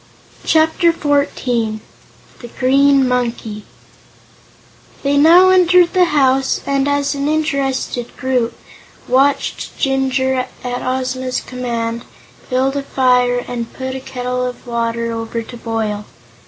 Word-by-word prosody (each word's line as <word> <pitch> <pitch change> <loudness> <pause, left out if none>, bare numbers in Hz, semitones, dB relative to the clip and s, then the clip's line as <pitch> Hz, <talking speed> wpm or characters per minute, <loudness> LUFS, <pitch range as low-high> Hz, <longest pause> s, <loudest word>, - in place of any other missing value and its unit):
Chapter 320 +2 +3
Fourteen 260 -8 -1 0.6
The 240 - -9
Green 270 +2 +3
Monkey 235 -4 -2 1.4
They 280 0 +1
now 335 +6 +7
entered 360 -1 +4
the 365 -1 +4
house, 270 -4 +2
and 275 0 0
as 285 0 0
an 280 0 -2
interested 275 -5 -2
group, 255 -3 -1 0.5
watched 275 +3 0
Jinjur, 265 -1 0 0.2
at 245 0 -3
Ozma's 255 0 -2
command, 235 -2 -4 0.5
build 265 +1 +1
a 280 - -1
fire 250 -2 +1
and 235 -2 -5
put 260 0 -5
a 265 - -4
kettle 250 -1 -4
of 250 0 -5
water 235 -1 -2
over 230 0 -4
to 240 - -11
boil. 220 -3 -3
260 Hz, 115 wpm, -17 LUFS, 245-280 Hz, 1.4 s, now